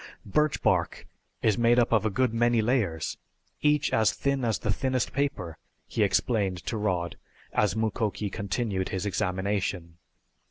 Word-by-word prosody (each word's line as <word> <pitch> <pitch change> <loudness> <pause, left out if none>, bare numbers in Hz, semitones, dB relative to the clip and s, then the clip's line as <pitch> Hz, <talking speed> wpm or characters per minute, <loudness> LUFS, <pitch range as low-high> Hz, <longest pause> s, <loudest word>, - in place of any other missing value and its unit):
"Birch 150 +9 +1
bark - - +1 0.4
is 110 -1 +3
made 120 +1 +4
up 120 - +3
of 110 -1 +3
a - - +1
good 125 +3 +1
many 120 0 +3
layers, 105 - 0 0.4
each 150 -1 +2
as 110 -1 +4
thin 140 -1 -1
as 115 -3 +1
the 105 - -1
thinnest 130 +1 -1
paper," 105 - -2 0.3
he - - -3
explained 100 -6 +1
to - - -2
Rod 90 -5 -1 0.4
as 105 - +2
Mukoki 110 -2 -1
continued 100 -1 -2
his 95 +1 -3
examination. 95 -2 -2
110 Hz, 150 wpm, -27 LUFS, 95-120 Hz, 0.4 s, made